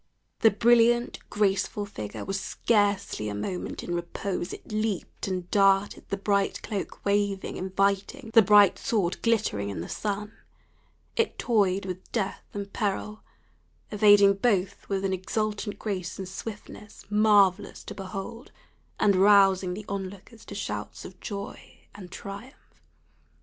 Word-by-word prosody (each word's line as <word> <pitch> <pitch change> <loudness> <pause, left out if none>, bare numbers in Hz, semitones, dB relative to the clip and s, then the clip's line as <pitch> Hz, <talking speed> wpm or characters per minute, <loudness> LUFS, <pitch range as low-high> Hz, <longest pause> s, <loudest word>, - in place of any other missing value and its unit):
The 225 - +6
brilliant, 235 +2 +3
graceful 205 0 0
figure 105 - -7
was 195 0 -2
scarcely 200 - 0
a 100 - -4
moment 180 - -4
in 175 - -4
repose; 175 +1 -3
it - - -10
leaped 215 -3 -2
and 185 -2 -3
darted, 195 0 +3
the 200 - -1
bright 200 0 0
cloak 200 -3 -5
waving, 200 -1 0
inviting, 200 +6 -1
the 225 - +9
bright 205 -1 +6
sword 195 -6 -1
glittering 215 - 0
in 100 - -4
the 85 - -6
sun 210 0 -3 0.8
it 460 - 0
toyed 200 -5 +1
with 185 -1 -7
death 200 -5 -2
and 200 -1 -6
peril, 210 +1 -2 0.7
evading 205 -1 +6
both 200 -3 0
with 195 -1 -1
an 190 - 0
exultant 210 +3 -2
grace 190 -5 -4
and 190 - -5
swiftness 210 +1 -9
marvellous 210 -2 +3
to - - -7
behold, 200 +5 -7 0.5
and 200 -2 +4
rousing 195 -2 +5
the 210 +1 -8
on 195 -1 -3
lookers 200 +4 -15
to - - -8
shouts - - -5
of - - -11
joy 200 -1 -7 0.2
and 185 -3 -11
triumph. 200 +8 -8
200 Hz, 140 wpm, -27 LUFS, 190-210 Hz, 0.8 s, the